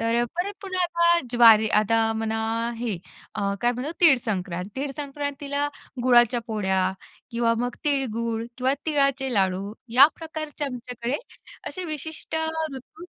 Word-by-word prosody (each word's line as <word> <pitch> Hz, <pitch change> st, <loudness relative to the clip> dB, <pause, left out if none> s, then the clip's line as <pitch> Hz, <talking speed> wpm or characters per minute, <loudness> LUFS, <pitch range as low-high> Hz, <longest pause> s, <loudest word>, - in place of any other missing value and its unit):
तर 230 Hz, +1 st, +2 dB
परत 360 Hz, +4 st, -2 dB
पुन्हा 370 Hz, -2 st, -1 dB
आता 340 Hz, 0 st, +3 dB
ज्वारी 225 Hz, -3 st, +7 dB
आता 225 Hz, +2 st, +2 dB
म्हणा 220 Hz, 0 st, -2 dB, 0.4 s
हे, 225 Hz, -4 st, -2 dB, 0.4 s
अ, 200 Hz, -1 st, -1 dB
काय 240 Hz, 0 st, +2 dB
म्हणतात 260 Hz, +7 st, -5 dB
तीळ 325 Hz, -6 st, +8 dB
संक्रांत. 185 Hz, -4 st, -3 dB
तीळ 275 Hz, +1 st, -2 dB
संक्रांतीला 285 Hz, 0 st, -3 dB, 0.3 s
गुळाच्या 240 Hz, -1 st, +5 dB
पोळ्या 190 Hz, -4 st, 0 dB, 0.4 s
किंवा 235 Hz, -1 st, +1 dB
मग 245 Hz, +1 st, -2 dB
तिळगूळ 230 Hz, -5 st, 0 dB
किंवा 260 Hz, +2 st, +1 dB
तिळाचे 275 Hz, -3 st, +1 dB
लाडू 195 Hz, 0 st, 0 dB, 0.3 s
या 275 Hz, -, +11 dB
प्रकारचे 310 Hz, -2 st, -5 dB
आमच्याकडे 250 Hz, -1 st, -4 dB, 0.5 s
असे 370 Hz, -, -6 dB
विशिष्ट 315 Hz, 0 st, -5 dB, 0.4 s
ऋतू 270 Hz, +6 st, -11 dB
245 Hz, 130 wpm, -25 LUFS, 225-290 Hz, 0.5 s, या